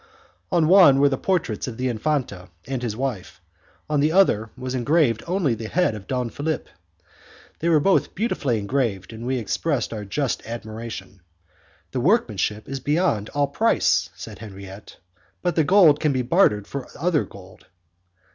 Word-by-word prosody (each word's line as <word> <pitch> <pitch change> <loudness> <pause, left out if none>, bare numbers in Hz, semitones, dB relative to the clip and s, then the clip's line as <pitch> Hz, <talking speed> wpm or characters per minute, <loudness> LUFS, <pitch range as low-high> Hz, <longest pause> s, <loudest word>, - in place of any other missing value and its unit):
On 170 -4 +3
one 175 -7 +7
were 140 0 +5
the 135 - 0
portraits 170 - -1
of 115 -3 -6
the 130 +1 -1
Infante 120 -6 -2 0.2
and 130 -1 -3
his 115 -3 -3
wife, 120 - -4 0.5
on 150 -1 0
the 150 +2 +2
other 135 - +3
was 130 0 -5
engraved 130 -2 +2
only 175 -7 +1
the 110 0 -5
head 180 -1 +1
of 105 -2 -9
Don 125 -3 -2
Philip. 155 +2 -3 0.9
They 170 - 0
were 160 -2 +5
both 195 +6 +2
beautifully 150 - 0
engraved, 105 -3 -2
and 115 +2 -7
we 130 0 0
expressed 120 +3 -1
our 105 -2 -5
just 130 +6 -2
admiration. 110 -4 -7 0.7
"The 130 - -2
workmanship 110 - +1
is 135 0 -4
beyond 140 - 0
all 145 0 +3
price," - - +1
said - - -9
Henriette, 100 -2 -11 0.5
"but 175 -3 0
the 160 - +3
gold 165 -3 +5
can 150 - +1
be 130 -1 0
bartered 120 - +3
for 140 -2 -6
other 165 -1 +1
gold." 95 -1 -14
130 Hz, 165 wpm, -23 LUFS, 110-155 Hz, 0.9 s, one